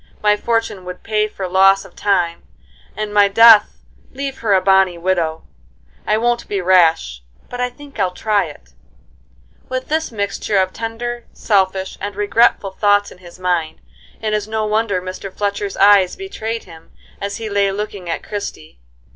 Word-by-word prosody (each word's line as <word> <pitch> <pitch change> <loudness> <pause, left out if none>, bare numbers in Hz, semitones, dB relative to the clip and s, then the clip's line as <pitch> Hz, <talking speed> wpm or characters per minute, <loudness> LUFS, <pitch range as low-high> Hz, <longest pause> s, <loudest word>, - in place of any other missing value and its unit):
My 210 0 +4
fortune 225 -3 -2
would 180 0 -8
pay 215 -1 0
for 195 -3 -6
loss 195 +2 +4
of 195 - -16
time, 180 -4 0 0.6
and 215 -1 -4
my 205 -1 +5
death 225 +1 +6 0.3
leave 270 0 -5
her 210 -4 +2
a - - +5
bonny 190 -2 +3
widow. 170 -3 -1 0.6
I 215 - +2
won't 240 +1 0
be 200 - -2
rash, 165 - +3 0.3
but 245 0 -4
I 250 - 0
think 280 0 -14
I'll 190 -2 +2
try 205 +2 0
it," 65 - -13 1.0
With 255 0 -4
this 315 -1 -1
mixture 200 -1 -2
of 185 -1 +1
tender, 235 +1 -5
selfish, 190 -2 0
and 205 -1 -4
regretful 205 -1 +2
thoughts 205 +1 +2
in - - -15
his 175 -1 -14
mind, 175 -3 -1 0.4
it 215 -1 -2
is 210 -1 -1
no 220 0 -2
wonder 210 -3 0
Mr. 185 +1 -6
Fletchcr's 200 0 -3
eyes 195 -2 +5
betrayed 230 - -5
him, 165 -2 -15 0.3
as 200 0 -3
he 225 -1 -5
lay 200 -1 +1
looking 200 -3 -5
at 165 - -3
Christie. 80 - -7
200 Hz, 165 wpm, -18 LUFS, 185-220 Hz, 1.0 s, death